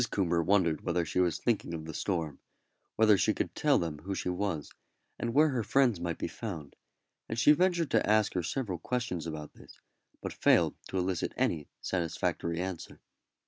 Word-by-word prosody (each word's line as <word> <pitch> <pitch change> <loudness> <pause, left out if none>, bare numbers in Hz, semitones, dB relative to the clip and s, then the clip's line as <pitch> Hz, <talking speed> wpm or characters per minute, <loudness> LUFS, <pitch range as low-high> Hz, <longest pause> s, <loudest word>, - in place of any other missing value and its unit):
Coomber 85 -4 +1
wondered 90 -4 +2
whether 85 -1 0
she 85 - -1
was 90 -3 +2
thinking 105 -8 -1
of 80 -1 -6
the 80 - -6
storm; 80 -5 -2 0.6
whether 110 -3 +5
she - - +2
could - - -2
tell - - +3
them 80 -3 -3
who 95 +5 -4
she 90 - -2
was, 90 -5 -2 0.5
and 120 - -1
where 150 +5 +5
her 130 -4 0
friends 120 -3 +2
might 85 -1 -3
be - - -2
found; 80 -11 -7 0.5
and 115 - -3
she 125 - +6
ventured 170 -1 +2
to 110 - +2
ask 110 -1 +3
her 90 - 0
several 95 - -3
questions 105 -6 -2
about 75 -2 -6
this, - - -16 0.4
but - - -5
failed - - +4
to - - -3
elicit 90 -2 -1
any 75 -4 0
satisfactory 85 -1 -1
answer. 90 -2 -5
90 Hz, 185 wpm, -30 LUFS, 85-110 Hz, 0.6 s, she